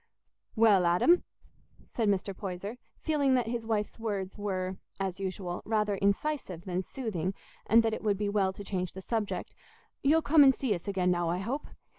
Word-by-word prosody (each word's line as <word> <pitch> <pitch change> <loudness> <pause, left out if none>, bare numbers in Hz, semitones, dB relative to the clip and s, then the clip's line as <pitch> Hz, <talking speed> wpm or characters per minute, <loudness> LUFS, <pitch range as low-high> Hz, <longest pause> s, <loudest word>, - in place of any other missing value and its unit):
"Well, 210 -6 +5
Adam," 255 - +4 0.7
said 225 -3 +1
Mr. 195 0 0
Poyser, 200 +4 -5 0.2
feeling 285 -4 +2
that 245 -2 +2
his 230 -1 -3
wife's 215 0 -1
words 200 -4 -3
were, 190 -3 -3 0.2
as 190 -1 -2
usual, 185 -2 -4
rather 210 -2 +1
incisive 200 - -1
than 185 -1 -1
soothing, 195 -5 -3 0.3
and 230 +2 +6
that 225 -1 +1
it - - -3
would 205 -2 +1
be 205 +1 -1
well 200 -2 +2
to 205 - -8
change 185 -2 -3
the 190 - -7
subject, 220 -2 -2 0.5
"you'll 315 +3 +4
come 300 0 +6
and 265 -2 +6
see 255 -6 0
us 175 -1 -6
again 185 -2 +1
now, 175 -1 +1
I 175 - 0
hope. 240 +10 -3
205 Hz, 180 wpm, -30 LUFS, 185-230 Hz, 0.7 s, and